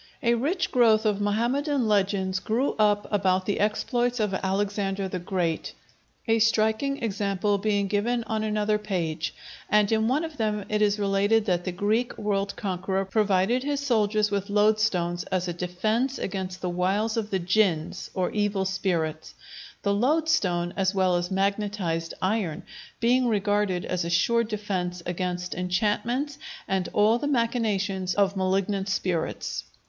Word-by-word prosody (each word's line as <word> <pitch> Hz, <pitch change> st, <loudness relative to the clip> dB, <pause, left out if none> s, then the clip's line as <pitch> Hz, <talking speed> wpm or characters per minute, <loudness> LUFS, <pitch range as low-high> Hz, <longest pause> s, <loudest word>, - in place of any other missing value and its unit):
A 235 Hz, -1 st, +4 dB
rich 300 Hz, +11 st, 0 dB
growth 225 Hz, -3 st, +4 dB
of 205 Hz, -1 st, +1 dB
Mohammedan 245 Hz, +6 st, 0 dB
legends 190 Hz, -2 st, +1 dB
grew 235 Hz, +8 st, 0 dB
up 205 Hz, -1 st, +3 dB
about 190 Hz, -2 st, +2 dB
the 205 Hz, -, -1 dB
exploits 240 Hz, +4 st, 0 dB
of 210 Hz, -3 st, 0 dB
Alexander 195 Hz, 0 st, -1 dB
the 185 Hz, -1 st, -4 dB
Great, 175 Hz, -2 st, -2 dB, 0.5 s
a 225 Hz, 0 st, +3 dB
striking 225 Hz, +5 st, +1 dB
example 200 Hz, -1 st, 0 dB
being 205 Hz, -1 st, +1 dB
given 225 Hz, +4 st, 0 dB
on 220 Hz, -1 st, -2 dB
another 210 Hz, 0 st, 0 dB
page, 170 Hz, -6 st, -3 dB, 0.3 s
and 210 Hz, 0 st, +3 dB
in 220 Hz, 0 st, +2 dB
one 275 Hz, +6 st, +1 dB
of 320 Hz, -2 st, -6 dB
them 210 Hz, -3 st, -1 dB
it 210 Hz, 0 st, 0 dB
is 205 Hz, 0 st, +3 dB
related 205 Hz, +2 st, +2 dB
that 180 Hz, -4 st, 0 dB
the 185 Hz, -, -1 dB
Greek 210 Hz, +7 st, 0 dB
world 200 Hz, -2 st, -1 dB
conqueror 190 Hz, 0 st, -2 dB
provided 205 Hz, +3 st, +2 dB
his 285 Hz, +1 st, -1 dB
soldiers 215 Hz, -6 st, +1 dB
with 200 Hz, 0 st, -2 dB
loadstones 205 Hz, -4 st, +2 dB
as 185 Hz, -1 st, -1 dB
a 175 Hz, -, -2 dB
defence 215 Hz, +10 st, -1 dB
against 185 Hz, -1 st, -4 dB
the 180 Hz, -, -2 dB
wiles 195 Hz, +5 st, 0 dB
of 220 Hz, -2 st, -2 dB
the 195 Hz, -, 0 dB
jinns, 180 Hz, -3 st, 0 dB
or 185 Hz, -1 st, 0 dB
evil 205 Hz, -2 st, 0 dB
spirits; 170 Hz, -5 st, -2 dB, 0.5 s
the 200 Hz, -, +2 dB
loadstone, 210 Hz, -, +1 dB
as 190 Hz, 0 st, 0 dB
well 185 Hz, -2 st, +3 dB
as 175 Hz, 0 st, -1 dB
magnetized 195 Hz, -4 st, -1 dB
iron, 185 Hz, -5 st, -1 dB, 0.4 s
being 245 Hz, +2 st, +3 dB
regarded 205 Hz, -4 st, +1 dB
as 180 Hz, -2 st, -1 dB
a 170 Hz, -, -3 dB
sure 235 Hz, +7 st, +3 dB
defence 190 Hz, -5 st, -3 dB
against 180 Hz, 0 st, -3 dB
enchantments 215 Hz, +10 st, -1 dB, 0.3 s
and 190 Hz, -2 st, -1 dB
all 215 Hz, +3 st, +3 dB
the 290 Hz, -, -2 dB
machinations 210 Hz, -7 st, 0 dB
of 200 Hz, -1 st, +2 dB
malignant 195 Hz, +1 st, 0 dB
spirits. 180 Hz, -4 st, -2 dB
205 Hz, 150 wpm, -26 LUFS, 185-220 Hz, 0.5 s, A